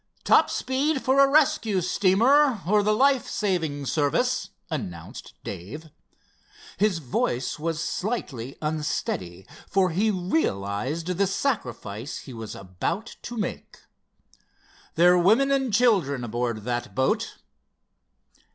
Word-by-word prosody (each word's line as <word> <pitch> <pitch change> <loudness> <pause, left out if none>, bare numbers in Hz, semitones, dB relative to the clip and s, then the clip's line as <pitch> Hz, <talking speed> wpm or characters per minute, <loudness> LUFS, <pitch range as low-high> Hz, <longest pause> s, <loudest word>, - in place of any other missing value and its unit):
"Top - - +5
speed 270 +2 -1
for 265 +1 +3
a 275 0 +6
rescue 285 -9 +3
steamer, 225 - +3
or 205 +3 +3
the 210 +1 +2
life 270 +4 +3
saving 165 -8 -1
service," 190 - 0 0.2
announced 90 - -6
Dave. 150 - -8 0.9
His 200 -1 +2
voice 130 -1 -2
was 165 +1 -2
slightly 140 - -4
unsteady, 95 - -3 0.2
for 190 -2 +2
he 200 +7 +1
realized 155 - -1
the 185 +2 0
sacrifice 130 - -3
he 130 - -10
was 115 -2 -7
about 100 - -4
to 240 - -7
make. 215 - -5 1.1
"There're 180 +2 +5
women 225 +10 +4
and 265 -3 +1
children 195 - +2
aboard 120 -1 -2
that 120 +1 -3
boat." 130 +1 0
175 Hz, 115 wpm, -25 LUFS, -, 1.1 s, a